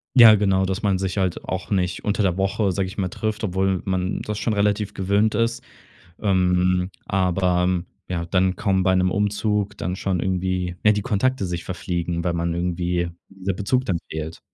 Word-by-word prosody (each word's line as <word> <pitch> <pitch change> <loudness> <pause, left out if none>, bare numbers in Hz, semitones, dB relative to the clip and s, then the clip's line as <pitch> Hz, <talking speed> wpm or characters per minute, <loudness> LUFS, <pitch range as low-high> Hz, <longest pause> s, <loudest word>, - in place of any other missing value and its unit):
Ja, 115 -3 +10
genau, 95 -2 +2
dass 95 +3 -2
man 100 -3 +2
sich 95 +1 -3
halt 95 -2 -1
auch 95 0 -4
nicht 90 -3 -1
unter 105 0 0
der 90 -1 +1
Woche, 95 +1 +1
sag 95 +1 -1
ich 95 +4 -8
mal, 95 -2 -1
„trifft“, 110 +3 -3
obwohl 95 -1 0
man 95 0 -1
das 105 -1 -4
schon 110 0 0
relativ 105 0 +1
gewöhnt 100 +3 +1
ist. 115 +2 0 0.6
Ähm, 90 -2 +2 0.2
aber, 90 -1 +1
hm, 90 -1 0 0.2
ja, 85 -2 -2
dann 95 +1 +2
kommen 95 -2 +1
bei 95 0 +3
'nem 90 0 +2
Umzug 105 0 0
dann 90 +2 -2
schon 95 -3 -1
irgendwie 90 -1 -1
ja, 105 - +7
die 105 -1 -1
Kontakte 110 0 0
sich 85 -1 -4
verfliegen, 85 -2 -3
weil 85 -1 0
man 85 0 -1
irgendwie, 85 0 -1 0.2
der 95 -1 -4
Bezug 125 +7 0
dann 90 -4 0
fehlt. 80 +1 -5
95 Hz, 190 wpm, -23 LUFS, 90-100 Hz, 0.6 s, Ja